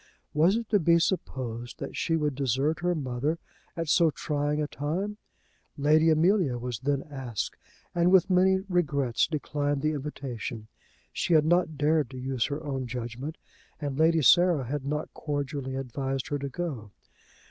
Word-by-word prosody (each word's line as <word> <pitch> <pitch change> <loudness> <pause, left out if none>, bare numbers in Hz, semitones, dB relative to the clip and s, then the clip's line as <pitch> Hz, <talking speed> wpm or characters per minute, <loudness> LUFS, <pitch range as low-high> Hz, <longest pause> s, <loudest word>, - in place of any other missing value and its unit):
Was 165 +7 +4
it 230 -1 -2
to 210 - +4
be 170 0 +4
supposed 125 - -2
that - - -6
she 165 - 0
would 150 -2 0
desert 135 +3 0
her 175 0 +1
mother 140 +2 -1 0.4
at 165 -1 -2
so 165 +1 +4
trying 150 -1 -1
a 150 - +1
time? 180 +10 -3 0.6
Lady 155 +3 +4
Amelia 160 -4 +3
was 120 -2 -4
then 140 +1 0
asked, 130 -7 -4 0.4
and 175 0 +3
with 190 -3 +6
many 190 0 +4
regrets 140 -9 +1
declined 145 -2 -2
the 155 - +2
invitation. 130 -6 -5 0.5
She 170 - +1
had 155 -1 +5
not 170 -2 +2
dared 150 -1 +2
to 130 - -9
use 130 -2 -1
her 145 +2 -4
own 135 -4 -3
judgment, 125 +5 -5 0.4
and 145 -3 -3
Lady 160 0 +4
Sarah 175 0 +5
had 140 +2 -3
not 150 +1 -3
cordially 140 -2 -3
advised 135 0 -3
her 145 - -1
to 140 0 -4
go. 135 -10 -4
145 Hz, 160 wpm, -28 LUFS, 135-165 Hz, 0.6 s, with